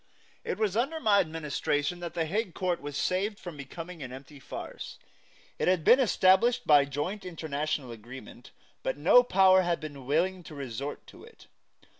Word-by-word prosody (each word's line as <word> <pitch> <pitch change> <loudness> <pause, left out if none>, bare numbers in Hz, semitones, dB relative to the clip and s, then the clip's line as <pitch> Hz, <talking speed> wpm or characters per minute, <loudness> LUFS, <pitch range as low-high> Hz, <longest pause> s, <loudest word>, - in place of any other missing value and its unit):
It - - -3
was 210 -3 0
under 275 +8 0
my 210 -8 +4
administration 155 -1 -1
that 170 -2 -6
the 165 - 0
Hague 195 +2 -2
Court 180 -2 -1
was 145 0 -5
saved 200 +3 0
from 175 -3 -8
becoming 165 +4 -8
an 130 -2 -6
empty 135 +2 -11
farce. - - -8 0.6
It - - 0
had 180 -3 +2
been 250 - +7
established 230 0 +3
by 145 -2 +6
joint 150 +9 -4
international 155 -6 -3
agreement, 120 +2 -11 0.3
but - - -2
no 245 - +6
Power 190 -5 +5
had 175 -2 0
been 145 -4 -9
willing 180 +6 +1
to 155 - -10
resort 140 +1 -6
to - - -15
it. - - -16
165 Hz, 170 wpm, -29 LUFS, 145-190 Hz, 0.6 s, been